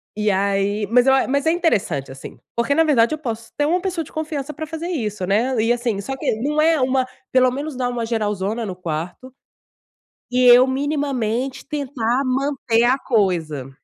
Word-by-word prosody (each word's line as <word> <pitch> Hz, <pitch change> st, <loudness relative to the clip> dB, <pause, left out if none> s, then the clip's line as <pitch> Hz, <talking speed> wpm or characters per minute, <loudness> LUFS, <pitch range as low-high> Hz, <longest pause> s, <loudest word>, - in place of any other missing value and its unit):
E 210 Hz, 0 st, 0 dB
aí 200 Hz, +2 st, 0 dB
mas 250 Hz, +2 st, +4 dB
eu 265 Hz, -, +6 dB
a 265 Hz, -, +2 dB
mas 280 Hz, +2 st, 0 dB
é -, -, +5 dB
interessante 195 Hz, -, 0 dB
assim. 135 Hz, -, -10 dB, 0.2 s
Porque 235 Hz, +4 st, +1 dB
na 325 Hz, -, +5 dB
verdade 290 Hz, -3 st, +3 dB
eu -, -, -12 dB
posso 230 Hz, -6 st, -6 dB
ter 290 Hz, -, +2 dB
uma 350 Hz, +4 st, +1 dB
pessoa 360 Hz, -4 st, -2 dB
de -, -, -16 dB
confiança 305 Hz, -2 st, -4 dB
pra 315 Hz, +2 st, -6 dB
fazer 320 Hz, +2 st, -5 dB
isso 210 Hz, -, -3 dB
né? 225 Hz, +7 st, +1 dB
E, 230 Hz, +2 st, +3 dB
assim, 235 Hz, -4 st, -2 dB
só 265 Hz, +7 st, -5 dB
que, 255 Hz, -, -1 dB
não 300 Hz, +4 st, +1 dB
é 320 Hz, 0 st, +3 dB
uma 260 Hz, 0 st, +1 dB, 0.2 s
pelo 255 Hz, 0 st, +4 dB
menos 285 Hz, +3 st, -5 dB
dar 250 Hz, -1 st, -1 dB
uma 240 Hz, -2 st, -3 dB
geralzona 215 Hz, -1 st, -2 dB
no 190 Hz, -3 st, -5 dB
quarto, 180 Hz, +8 st, -6 dB, 1.0 s
e 250 Hz, 0 st, +2 dB
eu 245 Hz, +1 st, +8 dB
minimamente 265 Hz, -3 st, -2 dB
tentar 265 Hz, -4 st, -1 dB
manter 260 Hz, -3 st, +1 dB
a 255 Hz, +3 st, +3 dB
coisa. 170 Hz, -, -1 dB
250 Hz, 190 wpm, -21 LUFS, 215-285 Hz, 1.0 s, eu